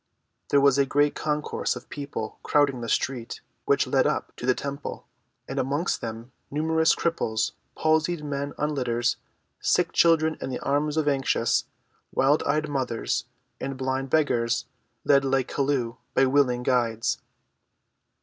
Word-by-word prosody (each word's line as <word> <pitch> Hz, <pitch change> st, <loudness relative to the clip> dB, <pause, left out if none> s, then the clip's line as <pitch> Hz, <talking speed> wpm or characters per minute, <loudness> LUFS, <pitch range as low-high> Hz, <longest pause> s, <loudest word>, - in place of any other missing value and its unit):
There 140 Hz, -, +5 dB
was 140 Hz, -1 st, +4 dB
a 140 Hz, -, +4 dB
great 145 Hz, +2 st, +2 dB
concourse 150 Hz, 0 st, -1 dB
of -, -, -9 dB
people 140 Hz, -7 st, -5 dB
crowding 140 Hz, -4 st, +2 dB
the 115 Hz, -, -4 dB
street 125 Hz, -3 st, -1 dB, 0.3 s
which -, -, +3 dB
led -, -, +2 dB
up -, -, -2 dB
to 120 Hz, -, -5 dB
the 130 Hz, -, +4 dB
temple, 140 Hz, +1 st, -5 dB, 0.4 s
and -, -, -3 dB
amongst 145 Hz, +7 st, 0 dB
them 115 Hz, +2 st, -6 dB, 0.2 s
numerous 160 Hz, +2 st, +2 dB
cripples, 115 Hz, -10 st, 0 dB, 0.3 s
palsied 155 Hz, +1 st, +1 dB
men 145 Hz, -1 st, -3 dB
on 150 Hz, +1 st, 0 dB
litters, 120 Hz, -3 st, 0 dB, 0.4 s
sick -, -, +2 dB
children 160 Hz, -2 st, +3 dB
in -, -, -3 dB
the 130 Hz, -, -2 dB
arms 145 Hz, +2 st, 0 dB
of 155 Hz, -2 st, +1 dB
anxious, 125 Hz, -4 st, +1 dB, 0.5 s
wild‐eyed 145 Hz, +2 st, +2 dB
mothers, 130 Hz, -7 st, -1 dB, 0.3 s
and 135 Hz, -1 st, -4 dB
blind 130 Hz, 0 st, -2 dB
beggars, 125 Hz, -6 st, +1 dB, 0.4 s
led 140 Hz, -1 st, +5 dB
like 135 Hz, -1 st, +1 dB
Chelluh 135 Hz, -4 st, 0 dB, 0.2 s
by 135 Hz, -, +5 dB
willing 130 Hz, -2 st, +2 dB
guides. 120 Hz, -3 st, +1 dB
140 Hz, 140 wpm, -26 LUFS, 125-150 Hz, 0.5 s, There